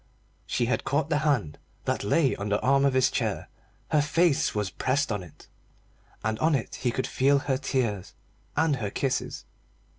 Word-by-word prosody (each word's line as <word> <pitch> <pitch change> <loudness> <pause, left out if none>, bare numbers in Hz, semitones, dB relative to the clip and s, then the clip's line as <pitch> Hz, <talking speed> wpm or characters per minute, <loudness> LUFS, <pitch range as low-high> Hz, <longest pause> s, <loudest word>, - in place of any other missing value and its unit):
She 120 - 0
had 125 - 0
caught 145 +3 0
the 150 - +3
hand 140 - 0 0.3
that - - -1
lay 135 +6 +2
on 100 +1 -4
the 100 0 +2
arm 135 +1 +3
of 135 -2 +2
his 130 0 +4
chair, 110 -4 -2 0.4
her 150 - +4
face 155 -2 +2
was 105 -2 -1
pressed 135 0 0
on 105 -2 -1
it, 85 -4 -14 0.8
and 110 0 -1
on 160 -1 +3
it 125 - -3
he 125 - +1
could 130 +2 -1
feel 140 +2 +3
her 140 -1 0
tears 120 -9 -2 0.4
and 155 -4 +3
her 105 -5 -3
kisses. 130 +4 -2
130 Hz, 180 wpm, -27 LUFS, 110-145 Hz, 0.8 s, his